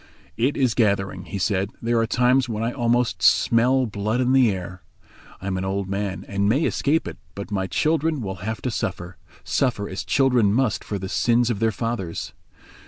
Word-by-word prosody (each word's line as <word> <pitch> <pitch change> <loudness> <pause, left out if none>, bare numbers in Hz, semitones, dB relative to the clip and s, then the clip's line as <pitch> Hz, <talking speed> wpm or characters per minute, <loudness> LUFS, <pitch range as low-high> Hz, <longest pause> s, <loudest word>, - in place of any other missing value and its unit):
"It 130 +5 0
is 130 -4 +2
gathering," 100 -4 0
he 100 - -5
said; 95 0 0
"there 115 0 +1
are 115 - +1
times 125 +2 +2
when 110 0 -2
I 115 - 0
almost 120 -1 0
smell 125 +3 +4
blood 110 +2 -2
in 130 0 +2
the 130 -3 +5
air. 90 -1 -6 0.6
I - - -10
am 95 -1 -1
an 95 - -3
old 95 0 -2
man 100 0 -3
and 100 0 0
may 135 +8 +2
escape 155 +1 +1
it, - - -8 0.2
but 100 +1 -7
my 95 -2 -1
children 160 - +1
will 95 -5 -4
have 110 +3 -4
to 125 - -1
suffer—suffer 100 - -3
as 95 - -5
children 125 -7 +3
must 115 -6 +1
for 105 - -4
the 95 0 -5
sins 120 +4 +2
of 105 - -3
their 115 0 +2
fathers. 110 -5 -4
110 Hz, 190 wpm, -23 LUFS, 100-125 Hz, 0.6 s, the